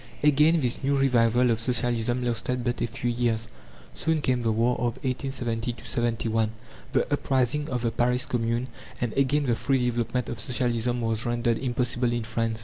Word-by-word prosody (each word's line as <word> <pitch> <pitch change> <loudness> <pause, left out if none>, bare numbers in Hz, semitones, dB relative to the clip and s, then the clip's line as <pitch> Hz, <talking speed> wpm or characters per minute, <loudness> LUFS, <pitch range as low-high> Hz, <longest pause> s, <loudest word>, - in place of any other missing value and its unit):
Again 150 +3 +5
this 125 +1 -1
new 140 +1 +2
revival 125 -2 +3
of 110 - 0
Socialism 120 0 0
lasted 120 +1 -1
but 120 0 -2
a - - +1
few 120 +1 -2
years. 115 -2 0 0.5
Soon 160 -1 0
came 130 -4 0
the 115 -1 +1
war 115 +3 +2
of 120 -1 -1
1870 120 -3 -2
71, 115 -2 0 0.4
the 135 - +2
uprising 140 +2 +1
of 125 -2 -2
the 115 - +1
Paris 125 +1 +1
Commune 115 0 -1 0.3
and 120 -3 -2
again 140 +2 +2
the 120 - +2
free 130 +1 +1
development 120 0 -1
of 115 - -5
Socialism 120 0 0
was 115 -1 0
rendered 120 -1 0
impossible 125 -1 +1
in 120 -1 -1
France. 115 0 -2
120 Hz, 170 wpm, -26 LUFS, 115-125 Hz, 0.5 s, Again